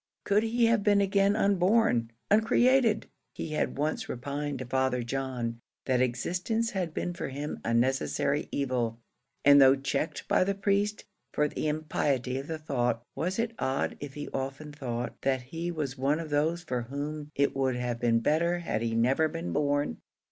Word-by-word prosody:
Could 205 +1 +3
he 230 +1 +2
have 230 -1 +3
been 205 0 +4
again 200 0 +3
unborn 200 - +3 0.2
uncreated! 230 +1 +4 0.3
He - - -5
had 155 - -1
once 150 +2 -1
repined 140 +3 -3
to 130 - -5
Father 130 -1 0
John, 120 -2 -3 0.3
that 130 -2 +2
existence 180 - 0
had 185 -5 -2
been 175 +2 -3
for 170 - -4
him 145 +3 -5
a 115 - -1
necessary 135 +3 +1
evil; 125 -4 -1 0.5
and 145 0 +8
though 135 0 +7
checked 135 +3 -3
by - - +4
the 200 +1 0
priest 200 +1 0 0.3
for 150 - +2
the 150 - -3
impiety 140 -4 -1
of 135 - -7
the 160 - -3
thought, 125 -6 -1
was 180 +4 -2
it 230 0 -1
odd 130 +1 -1
if 145 -2 -7
he 145 - -5
often 135 +3 -4
thought, 125 -4 -4
that 130 -2 0
he 165 +7 -4
was 145 -6 -4
one 140 +4 +2
of 160 -2 -6
those 160 +4 +1
for 125 -7 -2
whom 145 +4 -5
it 140 0 +1
would 135 -2 +1
have 120 -1 -2
been 115 -1 +2
better 170 +7 +2
had 170 -10 -2
they 115 -1 -1
never 130 +7 +3
been 165 +2 -4
born? 145 - 0
145 Hz, 175 wpm, -29 LUFS, 130-175 Hz, 0.5 s, and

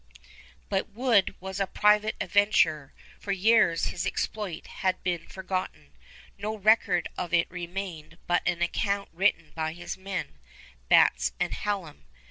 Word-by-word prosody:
But 195 -1 -1
Wood 225 -3 +2
was 190 +1 -6
a 195 - +1
private 210 +2 +3
adventurer. 160 -8 +2 0.3
For 200 - -4
years 200 -3 +3
his - - -3
exploit 200 -7 -3 0.2
had 185 -1 0
been 175 -2 -2
forgotten. 185 - -5 0.5
No 215 +2 -3
record 200 -4 +3
of 175 -1 -1
it 170 - +3
remained 175 -2 -6
but 175 0 +2
an 175 -1 +1
account 200 +3 -1
written 170 -3 +1
by 160 -1 -2
his 175 +2 -7
men, 190 - -5 0.5
Batts 65 0 +4
and - - -1
Hallam. 180 - -4
185 Hz, 135 wpm, -27 LUFS, 165-200 Hz, 0.5 s, Batts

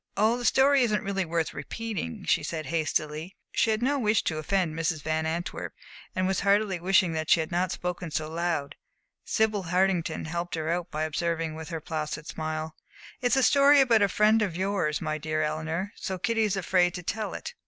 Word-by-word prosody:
"Oh, 215 +3 +4
the 245 0 -4
story 270 +3 +5
isn't 215 -5 +1
really 195 -1 -1
worth 165 -1 -1
repeating," 200 - -5
she - - +3
said, 160 -2 -4
hastily. 155 +1 -2 0.2
She - - +2
had 220 +1 0
no 280 +2 +2
wish 215 -3 +2
to 155 -1 -1
offend 175 +1 0
Mrs. 160 -2 -2
Van 160 0 0
Antwerp, 170 +2 -4 0.4
and 185 - +1
was 190 0 +1
heartily 200 -2 +2
wishing 185 -1 +3
that 155 -1 -3
she - - +6
had 160 +2 -3
not 175 +1 0
spoken 180 -1 -4
so 155 0 -2
loud. 165 -3 -2 0.5
Sibyl 215 -3 +1
Hartington 180 -2 +1
helped 170 +2 -3
her 160 0 -2
out 175 0 -2
by 155 -1 -2
observing, 165 +1 -1
with 160 -1 -8
her 165 -2 -3
placid 155 -1 -4
smile: 155 0 -4 0.5
"It's 245 -1 +2
a 265 - +3
story 280 +1 +6
about 240 -5 +5
a 200 - +4
friend 215 +2 +4
of 185 -5 -1
yours, 190 -5 0
my 155 0 -2
dear 155 +1 -1
Eleanor, 160 +5 -2
so 190 - -4
Kitty 225 +4 +1
is 200 -2 -1
afraid 180 -1 +2
to 180 - -6
tell 215 +5 -3
it." - - -6
175 Hz, 200 wpm, -27 LUFS, 160-205 Hz, 0.5 s, she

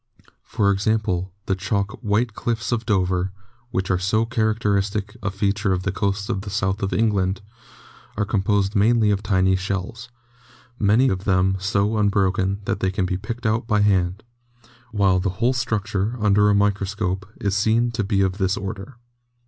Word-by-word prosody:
For 100 -1 +1
example, 95 -2 0
the 95 - 0
chalk 100 +1 -1
'white 110 +1 0
cliffs 120 +2 -2
of 115 -1 -1
Dover,' 95 -2 +1 0.4
which 95 -4 -1
are 90 - +1
so 110 +4 +1
character 110 -3 0
istic 100 +1 -1
a 100 - -1
feature 100 0 0
of 90 0 -2
the 100 - -1
coast 100 +1 -1
of 95 - -2
the 100 - -7
South 95 -1 -1
of 95 0 -1
England, 95 -1 +1 0.8
are 105 - +1
composed 100 0 0
mainly 110 +1 +3
of 100 -1 0
tiny 95 -3 +2
shells, 95 +5 -4 0.7
many 110 +5 +4
of 95 0 -3
them 95 0 +2
so 100 +2 0
unbroken 100 -1 +1
that 100 - -1
they 95 - +1
can 95 0 -1
be 90 - -1
picked 115 +5 -6
out 110 +1 0
by 105 -2 +2
hand, 95 -1 +1 0.7
while 100 -3 +3
the 95 +2 0
whole} 125 +5 +2
structure, 110 -3 -1
under 105 -1 +4
a 105 - +4
microscope, 100 -1 0
is 100 -4 -1
seen 110 +3 +2
to 115 -2 -2
be 100 0 +1
of 95 +1 0
this 95 0 +1
order. 100 +5 -6
100 Hz, 170 wpm, -22 LUFS, 95-110 Hz, 0.8 s, many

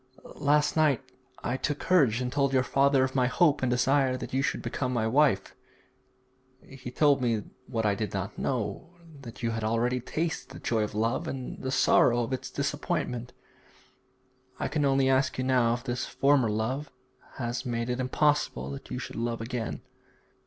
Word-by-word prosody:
Last 145 +1 +2
night 150 -4 +3 0.4
I 125 - -1
took 145 +1 -2
courage 135 -12 +3
and 125 0 -2
told 140 -1 +1
your 130 -1 +4
father 135 0 +3
of 130 0 -1
my 125 -2 +2
hope 150 +3 +3
and 130 - +1
desire 130 +1 +2
that 125 - -7
you 135 - +2
should - - -1
become 130 -2 -2
my 120 -3 0
wife. 140 +6 +2 1.1
He 130 -2 -9
told 140 +1 +3
me 115 -4 0 0.2
what 115 -3 -2
I 105 - +3
did 105 +1 -3
not 100 +1 -4
know, 125 - -3 0.3
that 120 -2 -10
you 115 - +1
have 115 -1 -3
already 115 +3 +1
tasted 165 +7 -3
the - - -8
joy 115 -2 0
of 105 -1 -3
love 115 +9 0
and 130 -4 -5
the 130 - -3
sorrow 120 -2 +4
of 115 - -4
its 130 - -4
disappointment. 140 -4 -2 1.3
I - - -1
can 150 -2 0
only 135 -1 +3
ask 130 0 +2
you 130 - -1
now 125 -3 +3
if 120 - -8
this 125 -1 -3
former 135 -4 +3
love 125 +7 -2 0.5
has 120 -1 -3
made 115 -2 -2
it 125 +1 -2
impossible 130 - +1
that 70 - -8
you - - -4
should - - -6
love 115 0 -2
again.' 115 - -4
130 Hz, 180 wpm, -28 LUFS, 115-140 Hz, 1.3 s, your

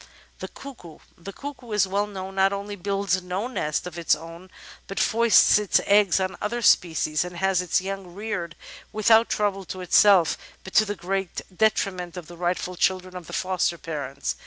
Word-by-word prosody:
The - - -5
Cuckoo 235 - -12 0.2
The 185 +3 -9
Cuckoo, 255 -1 -8
as 210 - +3
is - - -1
well 200 +2 0
known, 190 -2 -7
not 195 0 +3
only 200 +1 -5
builds 195 0 -1
no 180 +4 -3
nest 155 - -2
of 175 -1 -7
its 165 - +3
own, 165 +3 -11 0.4
but 195 - -7
foists 230 -2 +5
its 210 -2 +2
eggs 200 -2 +4
on 190 0 -2
other 235 +3 -2
species, 160 -5 +3
and 180 -1 -8
has 190 0 +1
its 180 0 +1
young 190 -2 -6
reared 190 -6 -4 0.4
without 220 +2 +4
trouble 200 -2 -1
to 185 +1 -7
itself 180 -1 +4 0.2
but 190 - -10
to 215 - +5
the 205 0 -4
great 190 -1 -3
detriment 185 -4 0
of 175 - -7
the 175 - -12
rightful 180 +1 -2
children 185 0 0
of 180 -2 -8
the - - -10
foster 185 -2 0
parents. 140 -4 -4
190 Hz, 185 wpm, -24 LUFS, 175-205 Hz, 0.4 s, foists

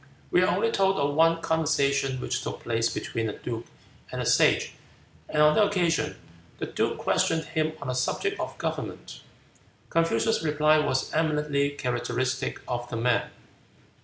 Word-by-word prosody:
We 180 - +4
are 185 - +3
only 205 +5 +1
told 195 -2 +2
of 145 0 +1
one 165 +2 +3
conversation 140 -4 +1
which - - -2
took - - -5
place 115 0 +1
between 115 -1 -3
the 105 - -3
duke 115 -1 -6 0.4
and - - -4
the - - -2
Sage, - - +3 0.6
and 150 0 +3
on 150 0 +6
that 210 +5 +4
occasion 180 -5 0 0.4
the - - -3
duke - - -1
questioned 160 0 +1
him 155 0 -1
on 145 - -7
the 125 - -1
subject 400 - -1
of - - -4
government. - - -5 0.7
Confucius' 165 +7 +2
reply 155 0 +3
was 130 -3 0
eminently 150 -2 +1
characteristic 130 -1 -2
of 120 -1 -3
the 115 - -3
man. 120 +1 +1
150 Hz, 160 wpm, -27 LUFS, 125-165 Hz, 0.7 s, on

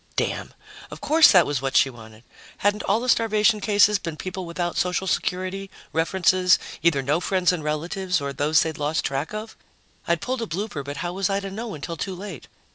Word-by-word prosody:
Damn! - - -2 0.4
Of - - -9
course 315 +2 +6
that 180 -5 +6
was 145 -3 -2
what 135 -1 +1
she 135 -1 +4
wanted! 110 -2 -14 0.3
Hadn't 205 +1 +1
all 200 +3 +2
the 250 - -4
starvation 215 -2 +3
cases 205 0 +4
been 165 -4 -6
people 185 0 -5
without 175 +1 -3
social 180 +1 0
security, 185 +1 -2 0.2
references, 180 +2 +3 0.2
either 155 -5 +2
no 145 +5 +1
friends 185 -1 +1
and 175 -4 -3
relatives 170 +4 -1
or 140 -1 -4
those 150 +3 +3
they'd 160 -2 -5
lost 150 +2 -1
track 135 +3 -2
of? 215 +1 -6 0.5
I'd 170 0 +2
pulled 255 +7 -3
a 230 - -3
blooper, 190 -5 -4
but 145 +1 -6
how 175 - -3
was 195 +1 -1
I 195 0 +1
to 195 0 -6
know 220 0 -5
until 165 +3 -6
too 190 +3 -4
late? 185 -5 -8
180 Hz, 200 wpm, -24 LUFS, 155-200 Hz, 0.5 s, course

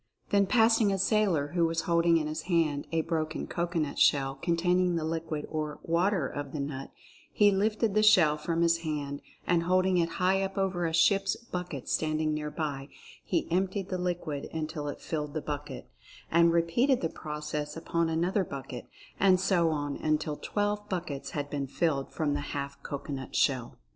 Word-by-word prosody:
Then 200 -2 +4
passing 225 -2 +4
a 195 - 0
sailor 190 -7 +2
who 170 +2 +1
was 165 0 -1
holding 170 -1 +3
in 155 - -1
his 155 +1 -3
hand 155 -5 +1
a 165 -1 +2
broken 160 -1 -2
cocoanut 170 -4 -2
shell 135 -1 +4
con 170 +5 -1
taining 180 +1 +2
the 165 - -1
liquid 160 -1 -3
or 155 -1 -4
"water" 170 -2 +1
of 145 0 -6
the 150 - -3
nut, 140 -1 -4 0.4
he 205 -1 +5
lifted 210 +2 +1
the 215 - +3
shell 175 -8 +6
from 165 +2 -1
his 170 0 +3
hand 145 -3 -4 0.2
and 170 -1 +2
holding 185 +1 +2
it 165 -1 0
high 190 +1 +2
up 195 +1 -3
over 185 -3 0
a - - -2
ship's 195 +4 +3
bucket 180 - -6
standing 155 0 0
nearby 150 -2 -3 0.3
he 170 - -1
emptied 190 +2 0
the 185 - -2
liquid 175 -5 -3
until 155 -2 -4
it 145 - -5
filled 150 -2 -4
the - - +1
bucket, 145 -2 -6 0.4
and 170 0 +5
repeated 170 +11 +2
the 165 - +1
process 150 -1 -5
upon 170 0 0
another 175 +5 +1
bucket, 135 -6 -7 0.3
and 185 -2 +5
so 175 -3 +2
on 145 -2 -2
until 155 -1 0
twelve 205 +4 -2
buckets 170 -7 -4
had 145 0 -2
been 140 -1 -3
filled 140 -1 -1
from 150 -2 -1
the 145 - -1 0.2
half 140 0 -5
cocoanut 140 -2 -6
shell. 130 -4 +1
165 Hz, 180 wpm, -29 LUFS, 150-185 Hz, 0.4 s, shell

